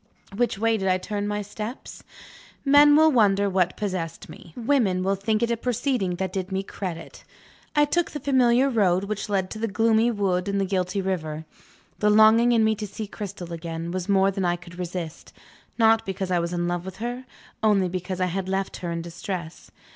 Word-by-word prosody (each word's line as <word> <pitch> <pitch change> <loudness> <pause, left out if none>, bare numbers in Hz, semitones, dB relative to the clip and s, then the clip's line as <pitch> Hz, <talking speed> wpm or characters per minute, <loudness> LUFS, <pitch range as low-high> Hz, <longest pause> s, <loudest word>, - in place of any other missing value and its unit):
Which 240 -1 0
way 225 +1 +2
did 190 -2 -2
I 185 0 +3
turn 205 +2 -4
my 210 0 -2
steps? 215 +4 -8 0.6
Men 290 +1 +7
will 315 +1 +6
wonder 205 -5 +3
what 185 -2 +1
possessed 185 -6 -4
me 170 - -12
women 225 -7 +1
will 195 +1 +1
think 215 +3 0
it 235 - +1
a - - +2
proceeding 245 -5 -1
that 185 0 -3
did 190 0 -3
me 190 0 -1
credit 180 -4 -7 0.5
I 295 0 +5
took 345 +4 0
the 295 - -6
familiar 260 -2 +3
road 195 -7 +2
which 205 0 -4
led 190 -2 -1
to 215 - -6
the 230 - -1
gloomy 225 +3 +2
wood 195 -5 0
and 200 0 0
the 195 - +1
guilty 185 0 -1
river. 160 -4 -3 0.5
The 210 - +3
longing 220 +3 +6
in 230 -2 +4
me 220 0 +3
to 210 0 -4
see 215 +2 -6
Cristel 200 -4 -7
again, 165 0 -5
was 185 +1 -4
more 195 0 +4
than 195 0 -3
I 175 -1 +2
could 175 0 -12
resist. 175 -2 -6 0.4
Not 225 -1 +4
because 190 -1 -4
I 180 - +2
was 170 0 -2
in 175 0 -1
love 175 0 -2
with 190 0 -8
her; 245 +3 -5 0.4
only 205 -4 +3
because 180 +1 -4
I 185 - +2
had 185 +1 -3
left 195 0 -2
her 175 -2 -4
in 170 0 -3
distress. 170 0 -6
195 Hz, 205 wpm, -25 LUFS, 180-225 Hz, 0.6 s, Men